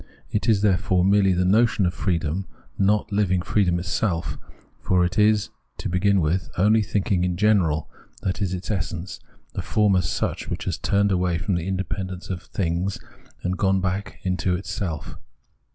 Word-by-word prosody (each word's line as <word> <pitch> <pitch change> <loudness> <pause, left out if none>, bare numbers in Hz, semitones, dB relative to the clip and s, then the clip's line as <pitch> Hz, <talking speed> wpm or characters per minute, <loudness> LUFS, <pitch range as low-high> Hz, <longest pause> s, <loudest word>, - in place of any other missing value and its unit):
It 105 +3 0
is, 105 -2 +3
therefore, 90 -2 +2
merely 100 0 +4
the 90 0 +1
notion 105 +1 +3
of 90 - 0
freedom, 90 0 -1 0.3
not 105 +2 +1
living 95 -3 +1
freedom 90 -4 +2
itseK; 90 -1 -2 0.4
for 90 -1 +2
it 90 +4 -1
is, 105 0 +3 0.3
to 105 - -4
begin 95 +2 +2
with, 85 +4 0
only 105 +4 +4
thinking 100 -3 0
in 90 -1 -1
general 90 -7 +2 0.4
that 95 +3 -2
is 95 -3 0
its 90 +2 -4
essence, 90 -1 -3 0.3
the - - -3
form 105 -2 +2
as 90 -4 +1
such, - - -2
which - - -3
has - - -2
turned 100 0 +2
away 90 -2 +1
from 95 +3 -2
the 85 0 -1
independence 95 0 -3
of 90 -2 -4
things 90 +1 -2 0.5
and 90 0 -2
gone 95 -1 +3
back 95 +1 -3
into 90 -1 0
itself. 90 -3 -4
95 Hz, 170 wpm, -24 LUFS, 90-100 Hz, 0.5 s, merely